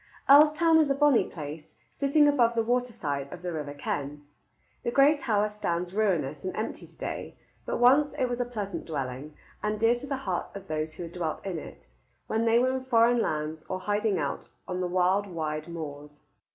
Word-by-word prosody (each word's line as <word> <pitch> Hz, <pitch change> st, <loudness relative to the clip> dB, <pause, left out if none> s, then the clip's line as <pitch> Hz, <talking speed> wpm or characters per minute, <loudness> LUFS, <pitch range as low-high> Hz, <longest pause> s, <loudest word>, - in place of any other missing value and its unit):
Earlstoun 305 Hz, +3 st, +6 dB
is 305 Hz, -3 st, +3 dB
a 275 Hz, -, +2 dB
bonny 290 Hz, -3 st, +4 dB
place, 150 Hz, -1 st, -8 dB, 0.2 s
sitting 290 Hz, +1 st, +4 dB
above 240 Hz, -5 st, +3 dB
the 230 Hz, -, +2 dB
waterside 220 Hz, -, -2 dB
of 180 Hz, 0 st, -9 dB
the 175 Hz, -1 st, -3 dB
river 145 Hz, -2 st, -5 dB
Ken. 145 Hz, +1 st, -4 dB, 0.6 s
The -, -, -2 dB
gray 275 Hz, +5 st, +5 dB
tower 210 Hz, -7 st, +1 dB
stands 180 Hz, -4 st, -3 dB
ruinous 170 Hz, -9 st, 0 dB
and 185 Hz, -, -4 dB
empty 215 Hz, -, -4 dB
to -, -, -19 dB
day, -, -, -5 dB, 0.3 s
but -, -, -1 dB
once 270 Hz, +4 st, +5 dB
it 255 Hz, -, 0 dB
was 245 Hz, 0 st, -3 dB
a -, -, 0 dB
pleasant 210 Hz, -5 st, -5 dB
dwelling, 140 Hz, -1 st, -5 dB, 0.3 s
and 210 Hz, 0 st, -1 dB
dear 230 Hz, +1 st, +4 dB
to 245 Hz, +3 st, -6 dB
the 275 Hz, -1 st, -2 dB
hearts 190 Hz, -9 st, -4 dB
of 195 Hz, -1 st, -8 dB
those 155 Hz, 0 st, -3 dB
who 175 Hz, -, -6 dB
had 165 Hz, -, -7 dB
dwelt 170 Hz, -1 st, -4 dB
in 180 Hz, -4 st, -3 dB
it, -, -, -12 dB, 0.4 s
when 225 Hz, +1 st, 0 dB
they 230 Hz, 0 st, +4 dB
were 255 Hz, +2 st, +3 dB
in 260 Hz, -, -3 dB
foreign 235 Hz, -1 st, +4 dB
lands 155 Hz, -1 st, -2 dB
or 185 Hz, -, -2 dB
hiding 205 Hz, +1 st, 0 dB
out -, -, -3 dB, 0.2 s
on 180 Hz, 0 st, -3 dB
the 180 Hz, -, 0 dB
wild 185 Hz, +3 st, +2 dB
wide 155 Hz, -3 st, -4 dB
moors. 150 Hz, -3 st, -8 dB
200 Hz, 200 wpm, -28 LUFS, 155-245 Hz, 0.6 s, Earlstoun